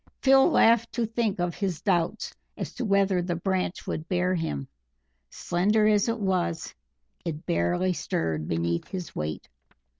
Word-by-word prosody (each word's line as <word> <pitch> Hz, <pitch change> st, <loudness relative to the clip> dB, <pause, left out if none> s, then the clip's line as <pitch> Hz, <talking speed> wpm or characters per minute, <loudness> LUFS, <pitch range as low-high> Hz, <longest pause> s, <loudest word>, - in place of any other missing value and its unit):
Phil 270 Hz, +3 st, +6 dB
laughed 230 Hz, -6 st, +4 dB
to 235 Hz, -, 0 dB
think 225 Hz, -3 st, -1 dB
of 175 Hz, -1 st, 0 dB
his 185 Hz, -5 st, -2 dB
doubts 175 Hz, +2 st, 0 dB, 0.2 s
as -, -, -5 dB
to -, -, -4 dB
whether 200 Hz, -3 st, +2 dB
the 175 Hz, 0 st, -2 dB
branch 185 Hz, +1 st, -2 dB
would 160 Hz, +1 st, -4 dB
bear 180 Hz, 0 st, +1 dB
him; 115 Hz, -, -2 dB, 0.6 s
slender 210 Hz, +5 st, +1 dB
as 210 Hz, +1 st, +3 dB
it 230 Hz, 0 st, -1 dB
was 180 Hz, -5 st, -1 dB, 0.5 s
it 160 Hz, -2 st, -5 dB
barely 85 Hz, -, +1 dB
stirred 80 Hz, -, -2 dB
beneath 85 Hz, +1 st, -1 dB
his 185 Hz, -3 st, -6 dB
weight. 75 Hz, 0 st, -4 dB
180 Hz, 150 wpm, -27 LUFS, 165-210 Hz, 0.6 s, Phil